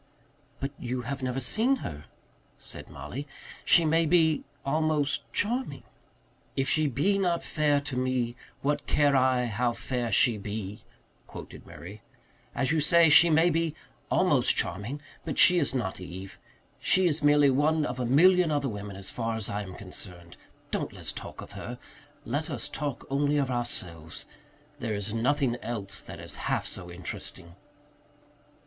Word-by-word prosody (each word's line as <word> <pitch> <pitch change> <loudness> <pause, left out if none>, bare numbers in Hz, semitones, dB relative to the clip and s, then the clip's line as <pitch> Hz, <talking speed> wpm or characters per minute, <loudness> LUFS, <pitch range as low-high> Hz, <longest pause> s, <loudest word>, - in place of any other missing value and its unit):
"But 135 +1 -3
you 125 0 -3
have 135 +3 -4
never 130 0 -1
seen 225 - +2
her," 75 -1 -7 0.5
said - - -8
Mollie. 140 +4 -7 0.4
"She 170 - +5
may 165 +1 +3
be 160 -2 +3 0.2
almost 150 0 0
charming." 245 +5 -1 0.7
"'If 135 -1 0
she 155 -1 +3
be 165 - +1
not 175 -3 +1
fair 150 -2 +1
to 145 -2 -4
me, 125 -2 0 0.3
what 145 +1 0
care 145 -2 +3
I 130 -1 +3
how 120 +2 0
fair 120 -1 -3
she 110 +1 +4
be?'" 105 0 -6 0.4
quoted - - -10
Murray. 100 +5 -10 0.5
"As 135 +1 +1
you 160 - +2
say, 165 +2 +5
she 160 +3 +8
may 165 +2 +4
be 165 -1 0 0.3
almost - - +3
charming; 110 +11 -1 0.2
but 150 - -4
she 180 -1 +8
is 140 -4 0
not 95 -7 -2
Eve. 95 +2 -9 0.4
She 185 0 +3
is 160 -3 +2
merely 145 -1 +5
one 150 +3 +2
of 125 -1 -4
a 125 - 0
million 180 +6 +5
other 145 -2 0
women, 100 -2 -6
as 95 0 -6
far 115 -1 -2
as 110 -3 -2
I 105 +1 -2
am 95 -2 -8
concerned. 90 -3 -7 0.4
Don't - - -2
let's - - -3
talk - - -8
of - - -12
her. - - -7 0.5
Let - - -2
us - - -3
talk 145 -3 -4
only 145 +1 +2
of 135 -3 0
ourselves 90 -10 -3 0.5
there 110 -2 -2
is 105 +1 -3
nothing 125 +1 +1
else 105 -6 -5
that - - -9
is - - -6 0.2
half - - 0
so 90 -2 -4
interesting." 85 -1 -8
135 Hz, 160 wpm, -28 LUFS, 110-150 Hz, 0.7 s, she